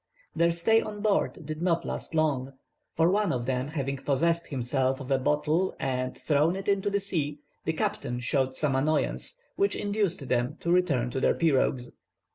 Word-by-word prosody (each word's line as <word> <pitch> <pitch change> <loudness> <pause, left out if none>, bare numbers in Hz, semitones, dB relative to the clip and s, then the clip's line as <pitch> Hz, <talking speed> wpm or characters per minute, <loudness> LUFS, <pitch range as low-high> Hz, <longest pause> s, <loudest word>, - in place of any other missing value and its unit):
Their 170 0 +4
stay 195 +7 +3
on 210 -1 -6
board 200 -5 0
did 155 +1 -5
not 170 -2 +1
last - - -4
long, 140 -4 +1 0.4
for 165 +2 +3
one 205 -2 +2
of 120 -4 -2
them 130 +1 -1
having 140 -3 -3
possessed 165 +5 +1
himself 130 -1 0
of 135 0 -7
a 135 - +3
bottle 150 +6 +1
and 130 -1 -2
thrown 155 +3 +2
it 195 0 -6
into 200 0 +2
the 200 0 +1
sea, 155 -7 -2 0.3
the 160 - 0
captain 155 - -2
showed 130 +1 0
some 140 -2 0
annoyance, 155 - 0 0.2
which 400 0 +2
induced 200 -8 -1
them 125 +5 0
to 170 - 0
return 145 -10 +2
to 135 - -2
their - - +3
pirogues. 135 -5 +1
155 Hz, 180 wpm, -28 LUFS, 130-180 Hz, 0.4 s, Their